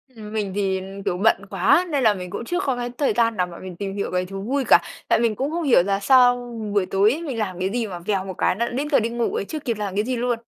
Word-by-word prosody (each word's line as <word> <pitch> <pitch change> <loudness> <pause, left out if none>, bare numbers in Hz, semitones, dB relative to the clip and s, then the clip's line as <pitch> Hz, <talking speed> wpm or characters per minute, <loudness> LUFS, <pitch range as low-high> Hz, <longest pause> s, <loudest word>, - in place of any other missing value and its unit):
Ừm, 215 -1 -9
mình 205 -3 -2
thì, 190 -2 0 0.2
kiểu, 180 - 0
bận 200 -1 +2
quá 195 - +3
nên 280 -4 0
là 215 -2 +5
mình 180 -2 -7
cũng 215 +5 -5
chưa 355 +6 -1
có 265 -3 0
cái 245 0 -3
thời 285 - +1
gian 230 -3 +1
nào 180 -1 +1
mà 170 - -10
mình 185 -2 -8
tìm 195 +1 -4
hiểu 200 - -3
cái 180 0 0
thú 195 +1 -7
vui 265 +6 -1
cả. - - +7 0.3
Tại - - +3
mình 230 -2 +1
cũng 275 +6 -2
không 340 0 -2
hiểu 245 - +5
là 195 0 0
sao 245 +3 +5 0.4
buổi 200 -3 +2
tối 195 +3 +3
ấy, 315 +5 -3
mình 275 -8 -4
làm 185 -5 -3
cái 185 +1 0
gì 230 0 -2
mà 180 -3 -7
vèo 195 +1 -1
một 190 - -5
cái - - +1
nó 235 +3 0
đã - - -5
đến 280 +4 -2
giờ 275 - +5
đi 225 +1 -1
ngủ 235 0 -1
ấy, - - -2
chưa 310 - -5
kịp 235 -6 -3
làm 200 -2 -4
cái 210 - +1
gì 255 0 -1
luôn. 240 -1 -1
215 Hz, 315 wpm, -23 LUFS, 195-245 Hz, 0.4 s, cả